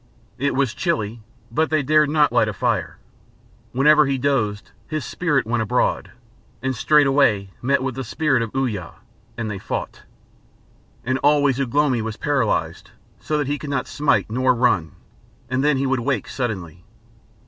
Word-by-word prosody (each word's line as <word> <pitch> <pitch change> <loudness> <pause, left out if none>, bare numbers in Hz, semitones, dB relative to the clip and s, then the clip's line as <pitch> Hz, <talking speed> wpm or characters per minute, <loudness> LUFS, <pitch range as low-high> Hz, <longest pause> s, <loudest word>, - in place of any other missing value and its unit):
It 140 +2 0
was 135 -4 +1
chilly, 120 - -2 0.3
but 160 +1 +1
they 155 -2 +1
dared 150 +1 +3
not 150 -1 +3
light - - +3
a - - -2
fire. - - -1 0.7
Whenever 150 +3 +5
he 135 -1 0
dozed, 120 -7 -1 0.2
his 155 -4 -3
spirit 150 -7 0
went 115 +1 0
abroad, 110 -3 0 0.5
and 130 0 -1
straightway 135 -8 +3
met 135 +2 +1
with 130 -1 -2
the 135 +2 -5
spirit 135 +2 0
of 115 - -2
Uya, 110 -10 -2 0.4
and 115 -1 -3
they 100 - -5
fought. - - -5 1.0
And 130 +1 0
always 145 -2 +3
Ugh 130 -4 -2
lomi 145 -5 +2
was 110 0 -5
paralysed 110 - -1 0.3
so 155 - -2
that 145 - 0
he 145 +1 -2
could 150 - -7
not 135 -2 -1
smite 130 -10 +1
nor 130 +2 +2
run, 95 - +1 0.6
and 130 +1 +1
then 150 -2 +3
he 135 - 0
would 130 -1 +1
awake 130 +3 -1
suddenly. 95 - -4
130 Hz, 165 wpm, -21 LUFS, 115-145 Hz, 1.0 s, Whenever